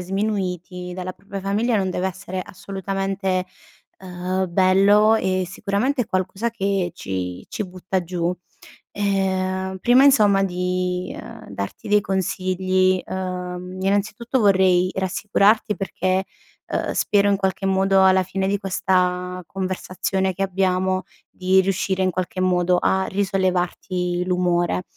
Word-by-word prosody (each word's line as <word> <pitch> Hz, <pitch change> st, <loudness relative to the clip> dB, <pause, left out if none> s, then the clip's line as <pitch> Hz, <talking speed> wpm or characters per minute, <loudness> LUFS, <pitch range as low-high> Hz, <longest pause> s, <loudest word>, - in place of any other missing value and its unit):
sminuiti 180 Hz, -2 st, -3 dB
dalla 185 Hz, 0 st, -5 dB
propria 200 Hz, +1 st, -8 dB
famiglia, 215 Hz, +4 st, +1 dB
non 190 Hz, -2 st, 0 dB
deve 185 Hz, +1 st, -1 dB
essere 185 Hz, 0 st, -6 dB
assolutamente, 195 Hz, -1 st, -3 dB, 0.5 s
ehm, 185 Hz, 0 st, -3 dB
bello 200 Hz, +4 st, +5 dB
e 185 Hz, -3 st, 0 dB
sicuramente 220 Hz, +8 st, -1 dB
è -, -, -8 dB
qualcosa 190 Hz, +5 st, -1 dB
che 195 Hz, -5 st, -1 dB
ci 90 Hz, -, -5 dB
ci 210 Hz, -, -3 dB
butta 185 Hz, 0 st, -3 dB
giù. 175 Hz, 0 st, -2 dB, 0.6 s
Ehm, 190 Hz, -1 st, -1 dB
prima 250 Hz, +5 st, +5 dB
insomma 210 Hz, -8 st, +5 dB
di, 180 Hz, 0 st, -2 dB
ehm, 230 Hz, -, -11 dB
darti 100 Hz, 0 st, -6 dB
dei 210 Hz, 0 st, +4 dB
consigli, 185 Hz, -1 st, +1 dB
ehm, 180 Hz, 0 st, -5 dB
innanzitutto 215 Hz, +6 st, 0 dB
vorrei 185 Hz, -3 st, +4 dB
rassicurarti, 205 Hz, +3 st, +2 dB
perché, 190 Hz, -1 st, -1 dB, 0.4 s
ehm, -, -, -2 dB
spero 205 Hz, -1 st, +2 dB
in 200 Hz, -, +2 dB
qualche 195 Hz, 0 st, -1 dB
modo 190 Hz, 0 st, +3 dB
alla 190 Hz, 0 st, +5 dB
fine 190 Hz, +1 st, -2 dB
di 200 Hz, -, +1 dB
questa 180 Hz, -1 st, 0 dB
conversazione 190 Hz, 0 st, -2 dB
che 195 Hz, -, -2 dB
abbiamo, 185 Hz, 0 st, 0 dB, 0.3 s
di 185 Hz, +1 st, +3 dB
riuscire 190 Hz, 0 st, 0 dB
in 185 Hz, -, +2 dB
qualche 185 Hz, +1 st, -3 dB
modo 180 Hz, -1 st, +2 dB
a 190 Hz, 0 st, +2 dB
risollevarti 180 Hz, -2 st, -1 dB
l'umore, 175 Hz, -, +1 dB
190 Hz, 125 wpm, -22 LUFS, 180-195 Hz, 0.6 s, bello